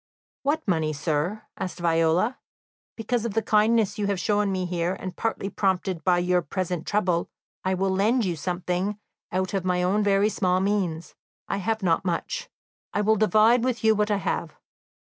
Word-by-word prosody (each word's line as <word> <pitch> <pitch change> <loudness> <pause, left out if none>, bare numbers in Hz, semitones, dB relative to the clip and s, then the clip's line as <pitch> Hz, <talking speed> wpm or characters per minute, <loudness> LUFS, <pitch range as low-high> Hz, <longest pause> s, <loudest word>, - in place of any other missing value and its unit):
"What 300 +1 -1
money, 160 -4 +1
sir?" 155 +8 -1
asked 180 -1 -5
Viola. 170 +7 +2 0.6
"Because 230 +1 -1
of 230 -3 -3
the 225 - +1
kindness 215 0 +2
you 205 - 0
have 200 -2 0
shown 205 +3 +1
me 185 -1 -1
here, 175 +1 -1
and 185 -1 -6
partly 225 -3 -2
prompted 190 -4 -1
by 180 -2 +3
your 180 0 +2
present 175 0 -3
trouble, 180 -5 +1 0.3
I 190 0 +1
will 190 +1 0
lend 215 +5 +2
you 175 -2 -1
something 180 +5 -2 0.3
out 185 +2 -1
of 195 -2 0
my 180 -1 +1
own 195 +4 +2
very 200 +1 +3
small 185 -3 +1
means; 185 -5 -1 0.3
I - - -1
have 215 +1 -2
not 170 -1 +2
much. 190 - -3 0.4
I 205 - 0
will 215 +1 +3
divide 220 +3 +4
with 250 -2 -1
you 220 0 +5
what 210 0 0
I 205 - +2
have. 170 -4 -3
190 Hz, 180 wpm, -25 LUFS, 180-215 Hz, 0.6 s, you